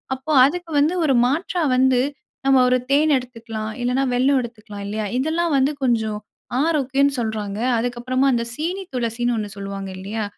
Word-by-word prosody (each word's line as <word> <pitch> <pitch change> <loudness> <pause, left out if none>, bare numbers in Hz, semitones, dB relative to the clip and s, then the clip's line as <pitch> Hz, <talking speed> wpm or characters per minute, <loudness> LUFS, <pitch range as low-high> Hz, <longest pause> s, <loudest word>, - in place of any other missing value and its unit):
அப்போ 265 +4 -6
அதுக்கு 340 +3 -3
வந்து 315 +5 +2
ஒரு 270 -3 +3
மாற்றா 335 +4 -1
வந்து 260 -1 +4 0.5
நம்ம 270 -1 +5
ஒரு 255 0 +3
தேன் 300 +1 +4
எடுத்துக்கலாம், 225 -3 -7
இல்லன்னா 255 +2 +1
வெல்லம் 265 +2 +3
எடுத்துக்கலாம், 215 -3 -9
இல்லையா? 210 0 -3
இதெல்லாம் 320 +2 0
வந்து 275 +3 +2
கொஞ்சம் 220 -3 0 0.4
ஆரோக்கியம்ன்னு 280 -3 +1
சொல்றாங்க. 215 -2 -3 0.2
அதற்கப்புறமா 245 +3 -1
அந்த 235 -1 +1
சீனி 355 +7 -3
துளசின்னு 240 0 -1
ஒண்ணு 210 -1 -3
சொல்வாங்க, 195 -1 -5
இல்லையா? 210 +3 -4
250 Hz, 150 wpm, -21 LUFS, 220-285 Hz, 0.5 s, நம்ம